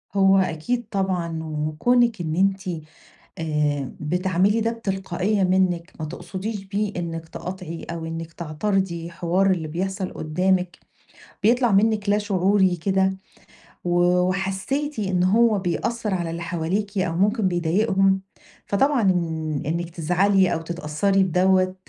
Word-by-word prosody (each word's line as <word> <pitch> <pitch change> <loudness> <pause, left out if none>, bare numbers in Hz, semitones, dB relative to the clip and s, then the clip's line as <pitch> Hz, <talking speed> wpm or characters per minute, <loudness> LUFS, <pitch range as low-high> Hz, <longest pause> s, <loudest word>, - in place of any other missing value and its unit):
هو 195 0 +5
أكيد 190 +7 -1
طبعًا، 180 -5 -1
وكونِك 175 +9 +1
إن 160 -1 -2
أنتِ 195 +1 +2 0.8
آآ 150 -4 -1
بتعملي 185 +6 +1
ده 230 +1 +1
بتلقائية 195 -2 -1
منِك، 185 -2 +1
ما 155 - -3
تقصديش 195 +6 -5
بيه 205 +1 -2
إنِك 165 -1 -5
تقاطعي، 180 -2 -6
أو 170 -1 -5
إنِك 165 0 -6
تعترضي 170 +1 -2
حوار 175 +4 +1
اللي 165 -4 -1
بيحصل 190 +4 -3
قدامِك، 180 +3 0 0.6
بيطلع 240 +1 +4
منِك 210 0 +2
لا 205 - +4
شعوري 195 -2 +2
كده، 190 +2 +1 0.7
و 175 0 +1 0.2
وحسيتِ 195 +10 -1
إن 185 -3 +1
هو 215 +2 +4
بيأثر 210 +4 -2
على 175 -2 -1
اللي 170 +1 -5
حواليكِ، 185 +5 -2
أو 175 -3 0
ممكن 205 +2 +2
بيضايقهم، 190 +2 +2 0.4
فطبعًا 270 +5 +2
إن 160 -6 0
إنِك 170 +2 -2
تزعلي، 180 +3 +2
أو 165 - -2
تتأثري 170 +4 0
بدوّة، 185 +1 +2
185 Hz, 125 wpm, -23 LUFS, 170-200 Hz, 0.8 s, هو